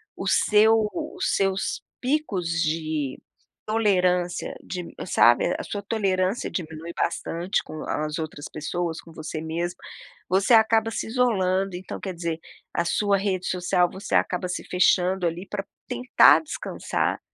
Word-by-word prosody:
o - - -5
seu 220 +1 +5 0.2
os 345 +4 -2
seus 195 -1 0 0.2
picos 250 - 0
de 155 -4 -1 0.5
tolerância 180 -5 +1
dim 180 -2 -6 0.2
sabe, 120 +5 +4
a - - -4
sua 205 - -4
tolerância 195 -1 0
diminui 160 -1 -5
bastante 170 +3 -1
com 155 0 -8
as 150 +1 -2
outras 155 -2 -5
pessoas, 165 +2 -3
com 165 - -15
você 155 0 -5
mesmo. 170 +2 -3 0.5
Você 195 +5 +3
acaba 225 0 +5
se - - -3
isolando, 195 -6 +1
então 180 +1 -6
quer 190 - -5
dizer, 165 -1 -3 0.3
a 170 - 0
sua 200 +3 +2
rede 190 -2 -1
social, 180 -1 +2
você 190 - -7
acaba 180 0 +1
se 180 - -3
fechando 180 0 +2
ali, 175 +4 -4
para 200 -1 -4 0.2
tentar 250 0 +5
descansar, 310 - -2
180 Hz, 140 wpm, -25 LUFS, 165-205 Hz, 0.5 s, seu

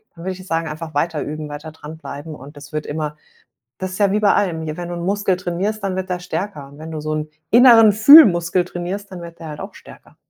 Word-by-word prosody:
Dann 165 - -11
würde 190 +1 -3
ich 185 - -11
sagen, 165 -2 -2
einfach 155 +1 -7
weiter 155 +1 -1
üben, 155 0 -6
weiter 150 +2 -8
dranbleiben 155 0 -9
und 145 +2 -13
das 145 +1 -12
wird 155 0 -3
immer 150 0 -4 0.6
Das 185 0 -4
ist 185 - -6
ja 200 -2 +2
wie 210 - +1
bei 205 -1 +4
allem, 175 -5 0
hier 155 -1 -5
wenn 175 -1 -6
du - - -4
'n 170 - -5
Muskel 200 -1 0
trainierst, 185 +4 -3
dann 195 -2 -2
wird 190 0 -4
der 180 - -1
stärker 180 -5 -5
und 140 +1 -16
wenn 160 +1 -9
du 155 -1 -5
so 155 +1 -3
'n 155 0 -4 0.2
inneren 230 -3 +7
Fühlmuskel 200 - +7
trainierst, 185 +3 -6
dann 180 -2 -8
wird 170 0 -11
der 165 - -8
halt 150 -1 -8
auch - - -7
stärker. - - -16
170 Hz, 250 wpm, -19 LUFS, 155-190 Hz, 0.6 s, inneren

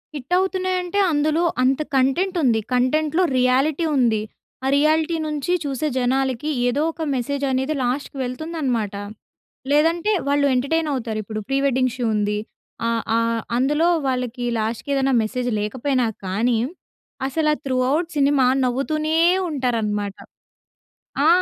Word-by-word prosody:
Hit 280 +3 -5
అవుతున్నాయి 370 0 0
అంటే, 360 +3 -2
అందులో 310 +2 +1 0.2
అంత 265 +3 +2
కంటెంట్ 310 +9 +1
ఉంది! 235 -4 +3
కంటెంట్‌లో 305 +7 +2
రియాలిటీ 270 +6 +2
ఉంది. 230 -4 +2 0.4
ఆ - - +1
రియాలిటీ 310 +3 +2
నుంచి 300 +1 -2
చూసే 280 +1 -2
జనాలకి 260 +2 0 0.2
ఏదో 245 +4 +1
ఒక 325 - -10
మెసేజ్ 280 +3 -2
అనేది 265 +3 0
లాస్ట్‌కి 265 +3 -2
వెళ్తుందన్నమాట. 255 -5 -2 0.8
లేదంటే 330 +7 +3 0.2
వాళ్ళు 285 0 +2
ఎంటర్‌టైన్ 310 +5 0
అవుతారు. 230 -4 -3
ఇప్పుడు 215 +1 -5
'ప్రీ 270 0 0
వెడ్డింగ్ 255 -2 +1
షో' 245 -2 -1
ఉంది. 210 0 0 0.5
ఆహ్, 230 -1 0
ఆహ్, 230 0 0 0.2
అందులో 295 +6 +2 0.2
వాళ్ళకి 250 -1 -2
లాస్ట్‌కి 225 +6 -3
ఏదైనా 270 0 +1
మెసేజ్ 245 +3 -2
లేకపోయినా 255 +4 0 0.2
కానీ 220 +6 +1 0.7
అసలు 305 +3 0
ఆహ్, - - -4
త్రూ 260 -2 0 0.2
ఔట్ 325 +2 0
సినిమా 280 -2 +3 0.2
నవ్వుతూనే 305 +5 0 0.4
ఉంటారన్నమాట. 215 -7 -1 1.1
ఆ! - - +5
265 Hz, 130 wpm, -22 LUFS, 245-305 Hz, 1.1 s, ఆ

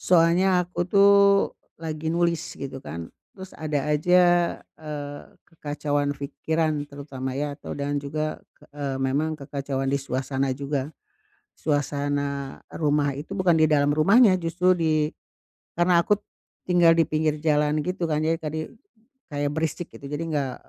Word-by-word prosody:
Soalnya 180 +1 +4
aku, 175 0 -4
tuh, 200 +1 +6 0.7
lagi 160 -1 -4
nulis, 170 -1 +1 0.2
gitu 135 -1 -6
kan. 80 +2 -7 0.2
Terus 190 -1 -10
ada 155 -2 -1
aja, 180 +5 +4 0.6
eee, 145 -2 -6 0.2
kekacauan 145 -3 -2
fikiran, 155 +2 -1
terutama, 140 -2 -6
ya, 145 0 -2
atau - - -7
dan 145 0 -1
juga 155 +2 -3 0.2
k - - -43
eee, 140 -2 -3
memang 145 +4 0
kekacauan 135 -1 -3
di 140 - +1
suasana 135 0 -1
juga. 140 0 -3 0.7
Suasana 145 -2 -2
rumah 145 -2 +1
itu, 160 +7 -6
bukan 185 -4 +3
di 155 - +5
dalam 145 -2 +3
rumahnya, 200 +7 +6
justru 180 +2 +2
di 155 -2 +1 0.7
karena 175 0 +4
aku 210 +2 +2 0.5
tinggal 175 -2 +5
di 165 - +4
pinggir 155 -1 0
jalan, 150 -1 +2
gitu 180 +1 -3
kan, 155 -2 0
jadi 160 +1 +1
kadi 155 0 -4 0.7
kayak 145 0 -1
berisik, 160 +2 -2
gitu. - - -12
Jadi 150 +2 -2
nggak 135 -3 -1
150 Hz, 140 wpm, -25 LUFS, 145-165 Hz, 0.7 s, tuh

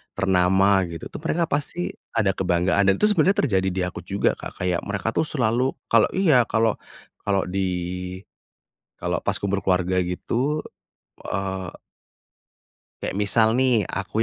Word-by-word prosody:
ternama 95 +1 +3
gitu 85 -1 -8
tuh - - -7
mereka 170 +1 +1
pasti 160 +3 -2 0.2
ada 105 -4 +3
kebanggaan 95 +1 +1
dan 95 - +5
itu - - -7
sebenarnya 190 +1 +3
terjadi 100 - +1
di 95 0 -2
aku 90 - -5
juga, 100 0 0
Kak, - - -9
kayak 90 -1 +1
mereka 100 +2 -2
tuh 160 - 0
selalu 125 -2 +1 0.2
kalau 115 -2 +5
iya 160 -10 +5
kalau 110 -1 +2 0.5
kalau 100 -2 +1
di, 95 +2 -2 1.4
kalau - - -2
pas - - 0
kumpul 100 0 -1
keluarga 90 0 +1
gitu, 120 +11 -1 0.7
eee 95 -1 -4 1.2
kayak 95 - -3
misal 110 +2 +3
nih 125 -4 +3
aku 100 +3 -1
100 Hz, 145 wpm, -23 LUFS, 95-120 Hz, 1.4 s, dan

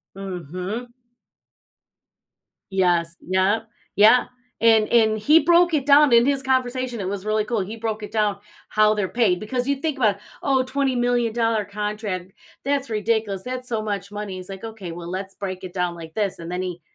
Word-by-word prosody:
Mhm. 190 - -5 1.8
Yes. 175 -3 +1
Yep. 195 +5 +1 0.3
Yeah. 220 +5 +6 0.4
And 225 -2 +5
and 220 -2 +3
he 300 +10 +5
broke 345 0 +4
it 285 -4 +1
down 290 -1 +6
in 235 0 +7
his 275 0 +1
conversation, 255 -2 -1
it 185 - -3
was 200 0 -5
really 215 0 +1
cool, 230 -1 -1
he 200 +4 -5
broke 220 -1 -3
it - - -9
down- 210 -2 +1 0.3
how 215 0 +4
they're 205 -3 -1
paid- 205 -6 +1
because 245 +4 -2
you 280 - +2
think 290 0 -3
about, 210 -5 +2 0.2
"Oh 270 -2 +2
$20,000,000 245 -4 0
contract. 205 -2 -4 0.3
That's 280 0 0
ridiculous, 215 -3 -1
that's 255 +1 -6
so 225 -2 -1
much 200 -2 -4
money." 205 -2 -5
He's 185 0 -9
like, 195 -1 -8
"Okay, 220 -6 -7
well, 170 0 -8
let's 190 +2 -5
break 190 -2 -6
it 180 - -7
down 180 -1 -1
like 160 -1 -10
this," 205 -3 -1
and 170 0 -7
then 180 +1 -2
he 180 -2 -5
215 Hz, 175 wpm, -23 LUFS, 190-245 Hz, 1.8 s, in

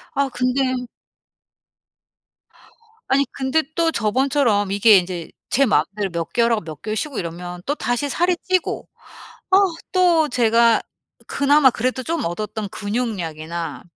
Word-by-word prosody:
아 280 -1 +1
근데 255 0 -1 2.2
아니 275 +1 +2
근데 270 +4 0
또 335 -1 +2
저번처럼 230 -4 +1
이게 205 +1 +6
인제 175 -2 -3 0.2
제 275 +1 +3
마음대로 195 +2 0
몇 170 -1 -4
개월 235 0 +2
하고 220 - +1
몇 155 -2 -9
개월 215 +1 -3
쉬고 280 +4 -3
이러면 175 +1 -6
또다시 285 -1 -1
살이 350 +4 +1
찌고 370 -2 -1 0.6
아 380 - +6 0.4
또 345 -4 +3
제가 230 -1 +3 0.5
그나마 280 -1 +4
그래도 255 +3 -2
좀 330 +4 -2
얻었던 210 +4 -4
근육량이나 175 -8 -4
235 Hz, 260 characters per minute, -21 LUFS, 200-275 Hz, 2.2 s, 이게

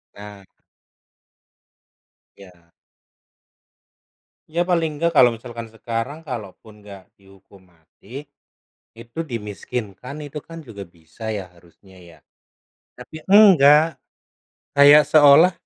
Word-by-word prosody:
Nah. 100 -1 -13 1.9
Iya. 90 -4 -19 1.8
Ya 170 +2 -2
paling 165 -4 -2
enggak 170 +2 -1
kalau 125 -4 +5
misalkan 115 0 -9
sekarang 115 +7 -7
kalaupun 110 -4 -10
nggak 100 -2 -15
dihukum 95 -1 -22
mati, 100 - -14 0.7
itu 115 +5 -13
dimiskinkan 115 - -8
itu 150 0 -9
kan 165 0 -12
juga 100 -3 -10
bisa 85 +5 -10
ya 100 -3 -6
harusnya 90 +3 -22
ya. 85 -3 -18 0.8
Tapi 155 - -12
enggak, 165 -7 +5 0.7
kayak 145 +1 +6
seolah 155 +4 +5
115 Hz, 95 wpm, -20 LUFS, 100-150 Hz, 1.9 s, kayak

